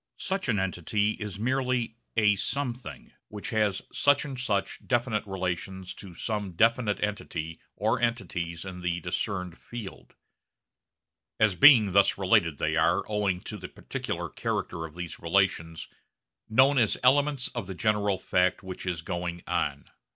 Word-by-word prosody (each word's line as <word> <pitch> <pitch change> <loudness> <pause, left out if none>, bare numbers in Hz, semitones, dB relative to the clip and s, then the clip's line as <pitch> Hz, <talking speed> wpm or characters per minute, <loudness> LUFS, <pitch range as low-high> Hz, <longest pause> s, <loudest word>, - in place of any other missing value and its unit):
Such 190 -6 -2
an 110 - +2
entity 95 +3 0
is 105 -3 -6
merely 125 0 0 0.2
a 105 -2 +5
'something' 125 +3 -4 0.2
which 105 -1 -6
has 105 -3 +1
such 145 0 +3
and 135 -3 -6
such 100 -6 -1
definite 120 -3 +1
relations 95 0 -3
to 95 -4 -11
some 105 -2 -3
definite 115 +2 +2
entity 80 -6 -3 0.2
or 110 +3 0
entities 90 -8 -2
in 90 -1 -7
the 90 0 -1
discerned 90 0 -3
field. 115 -5 -9 1.2
As 110 -3 +4
being 110 - +7
thus 100 +1 +4
related, 85 -5 +3
they - - 0
are - - +3
owing 100 -4 0
to - - -6
the - - -7
particular - - -4
character 80 -1 -3
of 80 - -17
these 90 -1 -6
relations 85 -2 0 0.6
known 130 +5 +5
as 110 -3 +2
elements 140 +1 +3
of 120 -7 -5
the 95 - -6
general 105 0 +1
fact 90 +1 +1
which 95 0 -7
is 85 -3 -2
going 85 0 -4
on. - - -1
100 Hz, 145 wpm, -28 LUFS, 90-115 Hz, 1.2 s, being